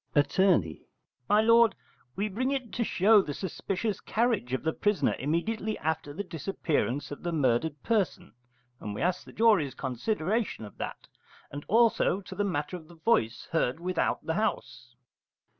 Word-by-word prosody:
Att. 145 +5 +2 0.9
My 210 +1 +5
lord, 230 0 +5 0.4
we 200 +3 -1
bring 235 +6 -1
it 265 -4 -3
to 240 - 0
show 210 0 +5
the 145 -6 -5
suspicious 195 +2 -3
carriage 225 - 0
of 130 - -2
the 160 0 0
prisoner 205 -1 +1
immediately 210 - -1
after 160 -1 -2
the 185 +8 -4
disappearance 155 -6 -2
of 145 - -7
the 175 - -2
murdered 145 0 0
person: 200 -5 -1 0.5
and 105 -1 -6
we - - -5
ask 180 +1 0
the - - -12
jury's 210 - +3
consideration 160 - -2
of 105 - -14
that; - - -6 0.4
and 145 +1 -6
also 225 -4 +3
to 185 - -10
the 205 - -1
matter 175 -3 -2
of 160 -3 -10
the 170 - -15
voice 125 - +1
heard 160 -3 0
without 180 0 -1
the 160 - 0
house. 125 - -3
180 Hz, 160 wpm, -28 LUFS, 145-215 Hz, 0.9 s, My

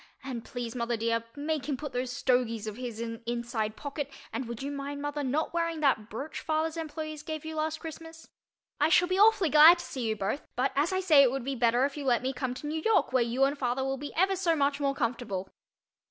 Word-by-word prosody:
And 250 -4 -5
please, 240 -2 -5
mother 235 -1 -1
dear, 230 +1 0
make 295 -1 -2
him 275 - 0
put 295 -1 -6
those 250 0 -2
"stogies" 245 -4 0
of 215 -1 -5
his 240 -2 -6
in 230 0 -3
an 230 - -11
inside 235 -2 -2
pocket 285 +1 -5 0.2
and 260 - -3
would 235 +2 -6
you 280 - -3
mind, 285 0 -5
mother, 290 +1 -3
not 285 +5 -1
wearing 335 -1 -1
that 230 -7 +2
brooch 275 +8 -5
father's 315 +1 -1
employees 310 -1 -5
gave 310 0 -6
you 315 0 -5
last 310 0 -1
Christmas? 325 0 -9 0.5
I 300 - +4
shall 355 +1 +5
be 370 +2 0
awfully 415 -6 +5
glad 310 +3 +9
to 345 - -7
see 260 - -6
you 220 - 0
both 215 +7 -2
but 255 +2 +1
as 295 +5 +2
I 375 0 0
say 315 -7 +6
it 270 - +6
would 265 0 -3
be 275 - -1
better 240 +1 +3
if 285 +1 -4
you 290 - -4
let 245 -2 +2
me 260 +1 -1
come 255 -1 -3
to 280 - -8
New 310 +2 -2
York 435 -8 +2
where 255 - +4
you 240 +3 +1
and 275 +1 +3
father 260 -1 -1
will 270 0 -1
be 290 +2 -6
ever 385 +3 +3
so 350 -3 +1
much 280 -1 +1
more 275 -1 0
comfortable. 230 -7 -2
275 Hz, 245 wpm, -29 LUFS, 245-310 Hz, 0.5 s, glad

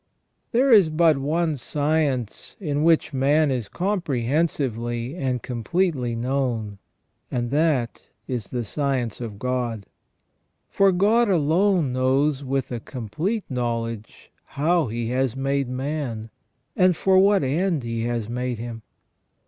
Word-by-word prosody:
There 255 +3 +3
is 200 -8 +7
but 155 -2 +3
one 155 +2 0
science 145 -3 -1
in 150 -6 -1
which 160 -2 +3
man 145 +3 +3
is 125 -5 -2
comprehensively 135 - -1
and 130 -7 -2
completely 125 - -1
known, 120 -5 -2 0.5
and 120 -1 -2
that 145 -6 +1 0.3
is 120 -5 -3
the 125 -2 -3
science 130 -1 -2
of 110 -4 -6
God. 120 -3 -2 0.9
For 195 -1 +4
God 210 +5 +3
alone 170 -2 +2
knows 135 +3 +1
with 135 -1 -2
a 120 - -3
complete 145 - -3
knowledge 115 -3 -4 0.3
how 165 +1 +2
He 115 +1 -3
has 130 -1 0
made 135 0 -1
man, 130 -4 -4 0.4
and 185 -2 +4
for 190 +3 +3
what 200 -2 +4
end 160 +2 0
He 115 -1 -3
has 120 -3 -2
made 125 +1 -3
him. 115 0 -6
135 Hz, 125 wpm, -24 LUFS, 120-160 Hz, 0.9 s, is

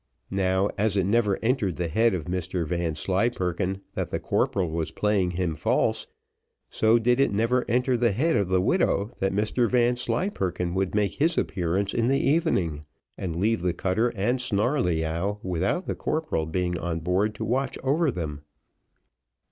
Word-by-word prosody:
Now, 95 +1 +1
as 105 -1 +1
it 95 - +3
never 105 -1 +2
entered 115 - +1
the 90 -1 -2
head 110 +4 +2
of 80 - -4
Mr 90 -1 -2
Vanslyperken 90 +3 -1
that - - -3
the - - -2
corporal 90 -5 0
was 80 0 -2
playing 105 -3 +1
him 90 -2 -1
false, 75 - 0 0.6
so 110 +1 +4
did 120 +2 +2
it 140 - +3
never 115 +5 +1
enter 125 +2 +2
the 120 0 +2
idea 155 0 +2
of 100 - -2
the 95 0 +2
widow, 100 +3 +1
that 95 - +1
Mr 110 +4 +1
Vanslyperken 120 - 0
would 95 +1 -1
make 105 -1 +1
his 165 +3 +2
appearance 95 +3 -1
in 115 0 +1
the 135 +1 +2
evening, 115 - +1 0.3
and 85 -3 -4
leave 110 +6 +1
the 90 -1 0
cutter 100 +7 +1
and 120 +6 0
Snarleyyow, 100 - 0
without 95 - -1
the - - -2
corporal 155 - -2
being 90 +1 -1
on 80 -1 -3
board 95 +5 0
to 110 - -4
watch 130 +5 -1
over 150 +4 +2
them. 80 - -4
100 Hz, 165 wpm, -26 LUFS, 90-120 Hz, 0.6 s, so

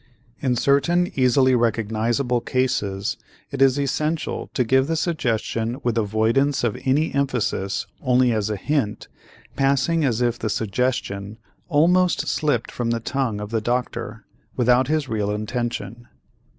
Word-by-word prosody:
In 130 -2 0
certain 140 +8 +2
easily 130 0 +3
recognizable 115 +1 0
cases, 105 -7 -1 0.3
it 140 -1 -4
is 135 +1 +4
essential 150 +3 -2
to 125 - +2
give 130 +3 +2
the 165 - 0
suggestion 120 -7 -1
with 120 -2 0
avoidance 115 +6 +1
of 120 -3 0
any 145 +4 +1
emphasis, 125 -8 -1 0.2
only 125 -1 +3
as 110 -2 0
a 105 - -1
hint, 115 0 -2 0.5
passing 140 +4 +2
as 120 -5 +1
if 120 -1 0
the 110 - -2
suggestion 105 -2 -2 0.3
almost 175 +4 +3
slipped 145 -7 0
from 120 -1 -2
the 115 0 0
tongue 115 -2 -2
of 105 +1 -6
the 115 -1 0
doctor 115 -2 -3 0.3
without 125 +1 +3
his 155 -1 0
real 105 -4 -1
intention. 115 +1 -4
125 Hz, 135 wpm, -22 LUFS, 110-140 Hz, 0.5 s, is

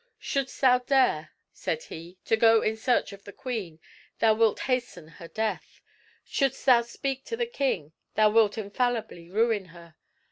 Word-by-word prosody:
"Shouldst 275 -2 -3
thou 250 -2 +5
dare," 265 +1 +2 0.2
said 480 - -3
he, 170 - -10
"to - - +3
go 225 0 +5
in 220 - 0
search 230 -2 0
of 200 0 -13
the 200 - -10
queen, 205 -10 -5 0.4
thou 225 -1 +4
wilt 220 -1 +2
hasten 245 -11 -2
her 165 +1 -12
death. 220 +4 -4 0.5
Shouldst 275 -3 -1
thou 250 -3 +6
speak 265 +3 -4
to 460 - -4
the 475 - 0
king, 260 - -2 0.2
thou 215 0 +4
wilt 220 -1 +3
infallibly 215 -5 -2
ruin 215 0 +1
her. 170 -2 -15
225 Hz, 165 wpm, -27 LUFS, 200-255 Hz, 0.5 s, thou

